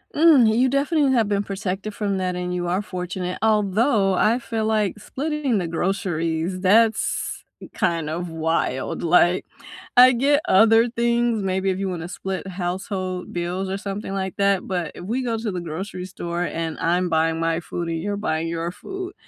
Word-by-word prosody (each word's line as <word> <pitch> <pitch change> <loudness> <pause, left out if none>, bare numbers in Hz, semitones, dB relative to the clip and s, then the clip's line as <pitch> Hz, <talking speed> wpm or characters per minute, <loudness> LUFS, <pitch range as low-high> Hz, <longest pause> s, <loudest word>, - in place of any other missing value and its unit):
Mm. 295 -6 +6
You 260 +1 +4
definitely 280 +1 +2
have 225 -4 +2
been 200 -1 +1
protected 195 +1 -4
from 200 -2 -1
that, 185 -1 -1
and 180 0 -3
you 175 -1 -2
are 185 +3 0
fortunate 180 -1 -4
although 210 -1 +2
I 225 +6 +3
feel 225 -2 -3
like 215 -3 0
splitting 275 +1 -2
the 175 - -2
groceries 170 -1 -1
that's 220 +4 +2 0.3
kind 165 -4 0
of 175 +2 -3
wild, 160 -5 -1
like, 175 +1 +4 0.5
I 255 +1 +9
get 280 +4 +3
other 225 +4 +5
things 235 -1 +1
maybe 190 0 0
if 185 - -2
you 195 - -2
wanna 175 -2 -4
split 190 +1 -5
household 185 0 -4
bills 180 +2 -3
or 195 - -2
something 200 0 -5
like 190 -1 -3
that 200 -2 +1
but 180 -3 -2
if - - -9
we 235 +7 -1
go 230 -2 -1
to 220 -1 -3
the 180 -2 -4
grocery 180 +3 -5
store 175 -2 -4
and 165 -2 -3
I'm 175 +2 +1
buying 165 0 +1
my 165 0 0
food 170 0 -5
and 165 -1 -2
you're 205 +1 -2
buying 160 -5 -1
your 165 +1 -3
food, 385 - -7
190 Hz, 175 wpm, -23 LUFS, 175-220 Hz, 0.5 s, I